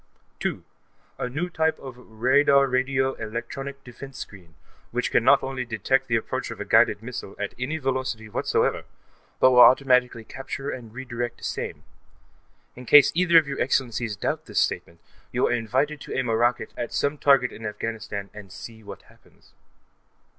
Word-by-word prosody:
2.) - - -3 0.6
A 125 - -2
new 155 +8 -2
type 160 -2 0
of 130 -2 -9
radar 130 +4 +3
radio 130 0 0
electronic 135 +5 -6
defense 135 +2 -11
screen, 90 -9 -10 0.3
which - - -2
can - - +3
not - - +5
only 135 -1 -3
detect 125 +3 0
the 115 - +1
approach 115 - -2
of - - -8
a - - -4
guided 105 +1 +3
missile, 115 -5 -7
at 100 -1 -4
any 140 +6 -2
velocity 130 -5 -2
whatever, 105 - 0 0.6
but 130 - +6
will 125 - +5
automatically 125 -2 +5
capture 135 +3 -6
and 120 -4 -8
redirect 120 -2 -5
same. - - -4 0.9
In 125 0 -11
case 145 -2 +8
either 170 -1 +4
of 160 -3 +5
your 140 - -3
Excellencies 120 -4 0
doubt - - -3
this - - 0
statement, 85 0 -2 0.3
you - - +1
are - - +1
invited 130 +6 0
to - - -5
aim 130 -2 -1
a 115 - +2
rocket 120 +2 0
at 120 - -4
some 145 +1 -1
target 135 -3 +4
in 110 - -11
Afghanistan 105 -2 -5
and 105 -3 -11
see 110 +3 -10
what 105 - -11
happens. - - -24
125 Hz, 170 wpm, -25 LUFS, 115-135 Hz, 0.9 s, case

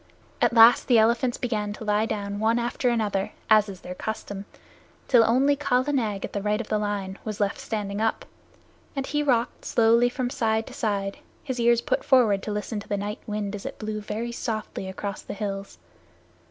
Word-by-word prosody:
At - - +4
last 230 +1 +7
the 245 - +5
elephants 235 +3 +3
began 210 -4 -2
to 215 - -9
lie 210 +1 +1
down 205 -2 -3
one 225 +2 +2
after 240 +1 0
another 210 -5 -1 0.2
as 215 -1 +6
is 190 -2 -9
their 180 - -6
custom, 200 0 -5 0.6
till 240 -3 +6
only 265 +5 +3
Kala 280 0 +1
Nag 215 -7 -1
at - - -10
the 200 - -2
right 210 +1 0
of 235 - -5
the 215 - +1
line 200 -2 -3
was 215 -2 -5
left 200 -1 0
standing 205 -2 -3
up; 225 - 0 0.7
and 275 -1 -2
he 295 +1 -1
rocked 250 -4 0
slowly 235 +1 +4
from 245 0 -3
side 220 -2 0
to - - -11
side, 200 -3 -2 0.2
his 260 -3 -4
ears 235 0 +4
put - - -1
forward 230 -7 +4
to 210 - -4
listen 210 +1 -3
to 205 - -11
the 205 - -1
night 205 +2 -4
wind 210 -1 -3
as 205 - -6
it - - -6
blew 215 -1 -4
very 220 +3 -4
slowly 215 -4 -4
across 195 +1 -5
the - - -7
hills. 195 - -5
220 Hz, 200 wpm, -25 LUFS, 205-235 Hz, 0.7 s, last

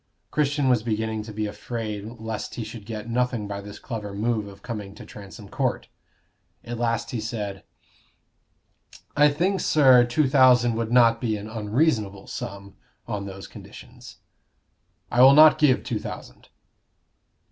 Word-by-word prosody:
Christian 145 -2 +1
was 125 -3 +3
beginning 110 -1 -2
to 110 +1 -9
be 110 0 -3
afraid 105 0 -5
lest 110 -1 -5
he 120 - -4
should 110 -1 -10
get 110 -1 -6
nothing 120 -2 -1
by 100 0 -5
this 100 0 -10
clever 105 -5 -6
move 110 0 -1
of 100 -1 -13
coming 105 -4 -6
to - - -11
Transome 100 +1 -11
Court. - - -2 0.7
At 120 0 -6
last 115 -1 -1
he 115 - -3
said 105 -3 -5 1.5
"I 150 0 +6
think, 180 +7 0
sir, 130 -5 +6
two 125 +4 +1
thousand 125 -3 +5
would 115 0 -3
not 115 -2 +4
be 110 -4 -1
an 105 +1 -8
unreasonable 110 -2 -1
sum, 100 0 -8 0.3
on 105 -3 -4
those 95 0 -8
conditions." - - -13 0.9
"I 120 - +3
will 135 +2 +8
not 155 0 +7
give 145 -4 +3
two - - -3
thousand." - - -9
115 Hz, 150 wpm, -24 LUFS, 105-125 Hz, 1.5 s, will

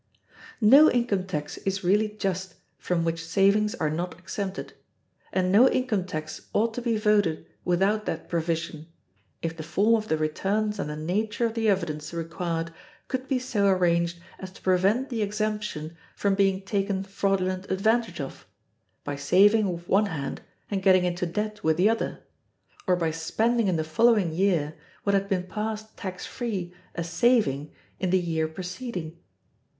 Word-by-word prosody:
No 275 +9 +8
income 215 -6 0
tax 150 -4 -4
is 195 0 -2
really 210 +4 +3
just 190 -3 -3 0.2
from 170 -2 0
which 165 0 -1
savings 200 +5 +3
are 155 -1 -1
not 170 +2 -3
exempted; 190 +2 -5 0.6
and 185 -1 +1
no 240 +7 +7
income 220 -8 0
tax 155 -3 -6
ought 225 +2 +2
to 245 - -4
be 235 -2 0
voted 210 -6 +2 0.2
without 195 +4 +1
that 165 - -3
provision, 165 -2 -2 0.6
if 165 -1 -2
the 165 - -7
form 195 +8 +2
of 215 -1 +1
the 160 - +1
returns 200 +7 -1
and 150 - -2
the 150 - -4
nature 210 +9 -1
of 225 - -1
the 225 -1 +1
evidence 155 -5 -1
required 165 0 -3 0.4
could 260 0 -3
be 265 - +1
so 235 -6 0
arranged 170 -2 +2 0.2
as 190 - -7
to - - -16
prevent 195 +8 +2
the 235 -4 -2
exemption 210 -6 -2 0.2
from 200 -1 +1
being 195 -1 +2
taken 195 -1 -1
fraudulent 195 -1 -1
advantage 220 0 +1
of, 135 -2 -7 0.6
by 145 - -3
saving 195 +8 +4
with 170 0 -7
one 205 +2 +3
hand 145 -7 -4 0.3
and 195 -1 0
getting 185 -1 +5
into 175 0 -1
debt 210 +4 -3
with 160 0 +2
the 185 +4 +4
other, 225 +1 -1 0.7
or 180 - +4
by 165 -2 0
spending 220 +8 +1
in 185 - +2
the 160 - 0
following 195 +1 +3
year 165 -4 +1 0.3
what 200 - +1
had 195 0 +1
been 185 -2 +1
passed 215 +3 -5
tax 185 -2 -6
free 195 -8 -4 0.2
as 170 -1 -3
saving 170 - +2 0.3
in 185 - 0
the 185 - +4
year 160 -2 -1
preceding. 180 0 -6
190 Hz, 165 wpm, -26 LUFS, 170-210 Hz, 0.7 s, No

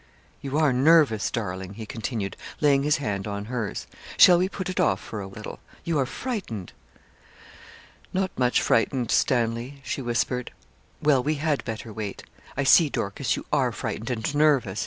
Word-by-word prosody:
'You 140 +1 -2
are 155 -4 +3
nervous, 135 -5 +4
darling,' 95 -3 -4
he 110 0 -7
continued, 110 -2 -4 0.2
laying 140 -2 +4
his 150 +1 +2
hand 105 -7 -3
on 100 0 -4
hers. 115 -3 -4 0.3
'Shall 175 -1 +8
we 185 +1 +1
put 190 -1 -5
it 185 - -3
off 95 - +2
for 110 -1 -7
a 95 - -6
little? 105 +2 -9 0.2
You 165 -3 0
are 130 - +1
frightened.' 175 - -5 1.4
'Not 190 0 0
much 125 -1 +2
frightened, 120 +1 +1
Stanley,' 120 +2 +1
she - - -3
whispered. 125 0 -1 0.5
'Well, 145 -4 +4
we 150 +4 0
had 150 -1 -1
better 110 -1 -6
wait. 105 -2 -5 0.3
I 140 - +1
see, 150 +3 +6
Dorcas, 100 -6 -1
you - - -7
are - - +2
frightened 110 +3 -4
and 120 +2 -2
nervous. 140 -9 +2
125 Hz, 165 wpm, -25 LUFS, 110-145 Hz, 1.4 s, Shall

